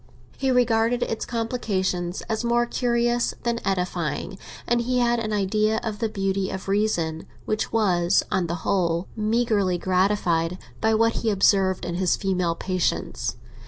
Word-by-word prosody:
He 270 - -1
regarded 240 -1 +2
its 225 - -3
complications 195 -7 -2
as 220 +1 -2
more 240 0 +2
curious 240 0 0
than 235 -1 0
edifying, 180 -1 -2 0.3
and 240 0 +2
he 250 +1 0
had 240 -1 +2
an 220 -1 -3
idea 215 +2 +1
of 215 -3 -4
the 225 - 0
beauty 195 -1 -1
of 190 0 -6
reason, 185 -6 0 0.2
which 215 - -1
was, 185 -5 +2
on 180 -2 +1
the 170 - -2
whole, 170 -2 +1
meagrely 215 -4 +1
gratified 180 -2 +1 0.2
by 220 0 +3
what 230 +1 +2
he 230 - 0
observed 195 -2 +3
in 175 - -3
his 180 0 +1
female 180 -4 0
patients. 185 0 -2
205 Hz, 150 wpm, -24 LUFS, 185-230 Hz, 0.3 s, by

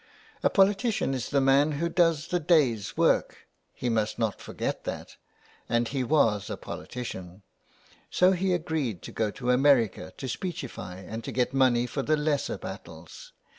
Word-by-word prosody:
A - - +3
politician 200 - +2
is 130 -3 -3
the 140 - +2
man 135 +3 +4
who 160 +4 -1
does 165 -2 +2
the 180 - +1
day's 145 - +2
work; - - +1 0.2
he 125 - -5
must 110 -2 0
not 110 -4 -1
forget - - -4
that; - - -6 0.5
and 120 0 +1
he 135 -2 -1
was 115 -7 +2
a - - -4
politician. 95 -6 -7 0.7
So 180 +1 +4
he 185 0 +1
agreed 155 - -2
to - - -8
go 110 -1 -1
to 125 +3 -2
America 125 - +3
to 135 - -5
speechify 130 - -5
and 110 +3 -6
to - - -5
get 125 +1 0
money 125 -3 +3
for 135 +3 -3
the 155 +3 +1
lesser 150 -1 -1
battles. - - -10
135 Hz, 165 wpm, -27 LUFS, 115-160 Hz, 0.7 s, man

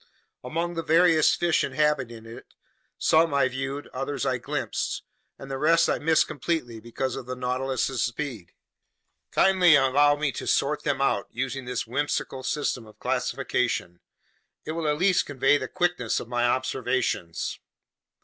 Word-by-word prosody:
Among 165 +7 -2
the 165 - -2
various 165 -1 +4
fish 175 -1 +1
inhabiting 130 -7 -1
it, 115 +1 -12 0.4
some 160 -2 +3
I 140 -1 +4
viewed, 135 +2 -4
others 135 +2 -3
I 130 -2 0
glimpsed, - - -3 0.3
and 135 0 -9
the 135 - -3
rest 165 +3 +4
I - - 0
missed 160 0 +3
completely 140 -5 -3
because 120 +3 -4
of 130 -2 -7
the 130 - -4
Nautilus's 130 0 -1
speed. 120 - -4 0.8
Kindly 185 -4 +5
allow 145 +2 +4
me 145 -1 -1
to - - -6
sort - - +1
them - - -1
out - - +1
using 130 +1 -4
this 125 -1 -3
whimsical 135 +1 -2
system 130 -4 -2
of 110 - -17
classification. 90 -8 -1 0.7
It - - -3
will 160 -1 -2
at 150 0 +1
least 185 +2 +2
convey 135 +1 +2
the - - -4
quickness 175 -10 0
of - - -8
my 120 0 0
observations. 130 -8 -1
135 Hz, 150 wpm, -26 LUFS, 125-155 Hz, 0.8 s, Kindly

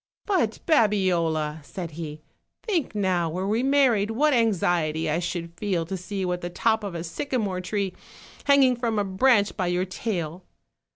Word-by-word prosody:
"But, 335 - +1
Babiola," 175 - +2
said 170 +2 -6
he, 155 -1 -7 0.4
"think 345 - -1
now, 185 -4 +1
were 180 +4 -3
we 220 +3 +1
mar 275 -1 +4
ried, 210 -1 0
what 290 +7 +2
anxiety 175 -9 +1
I 155 +2 +1
should 170 -1 -4
feel 175 -2 -1
to 190 - -4
see 195 +2 -5
you 180 -1 -1
at 180 - -4
the 175 - -4
top 220 +4 +1
of 195 -4 -5
a 165 - -4
sycamore 200 - -2
tree, 195 0 -2 0.5
hanging 275 -3 +5
from 235 -2 -1
a 205 - +2
branch 205 +2 +3
by 185 -3 -1
your 175 +1 0
tail. 180 -3 -4
190 Hz, 175 wpm, -25 LUFS, 170-225 Hz, 0.5 s, hanging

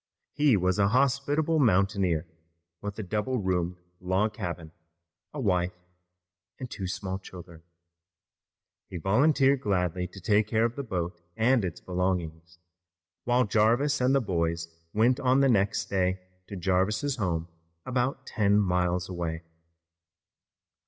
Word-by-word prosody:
He 145 -7 +4
was 90 +1 +1
a 100 - +4
hospitable 140 +6 +1
mountaineer, 95 - +2 0.6
with 105 0 -5
a 110 - -4
double 105 +7 -1
roomed 90 -3 -1 0.2
log 95 +4 0
cabin, 85 -7 -5 0.6
a 150 - -6
wife 90 -6 0 0.8
and 130 - -6
two 95 - -4
small 95 +1 -4
children. 85 -3 -12 1.3
He 90 - -6
volunteered 135 - +3
gladly 90 -2 0
to 95 - -12
take 105 +3 +2
care 110 +1 +2
of 120 0 -2
the 140 - -3
boat 90 -7 -4 0.2
and 115 +1 +3
its 90 -3 -4
belongings, 90 -2 -3 0.7
while 125 +1 +3
Jarvis 120 +7 +2
and 130 +2 +3
the 135 - +3
boys 85 -5 -1 0.2
went 120 +5 +3
on 130 +1 +3
the 135 - +4
next 105 -2 +1
day 95 -1 +1 0.3
to 100 - -7
Jarvis's 95 - 0
home 85 -6 -1 0.4
about 130 +1 -1
ten 100 -1 +2
miles 90 -2 0
away. 85 -2 -4
100 Hz, 130 wpm, -28 LUFS, 90-125 Hz, 1.3 s, He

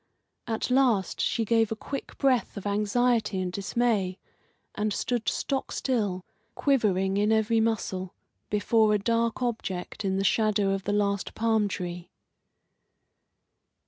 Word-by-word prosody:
At 225 +2 -2
last 250 -7 +2
she 230 - 0
gave 225 0 +2
a - - 0
quick 275 +5 -7
breath 255 -7 +1
of 200 - -7
anxiety 210 +1 +1
and 185 -1 -2
dismay, 200 -2 0 0.6
and 210 0 -1
stood 235 +2 -1
stock 270 -1 -2
still, 205 -8 -1 0.3
quivering 200 -8 +1
in 210 +1 +2
every 220 +1 +3
muscle, 195 -5 -1 0.3
before 210 +1 +3
a - - +4
dark 230 +3 0
object 215 -4 -3
in 190 -1 0
the 195 - 0
shadow 205 0 +2
of 195 -1 -2
the 205 - 0
last 200 -1 0
palm 220 -2 +2
tree. 180 -2 -5
210 Hz, 135 wpm, -27 LUFS, 195-230 Hz, 0.6 s, a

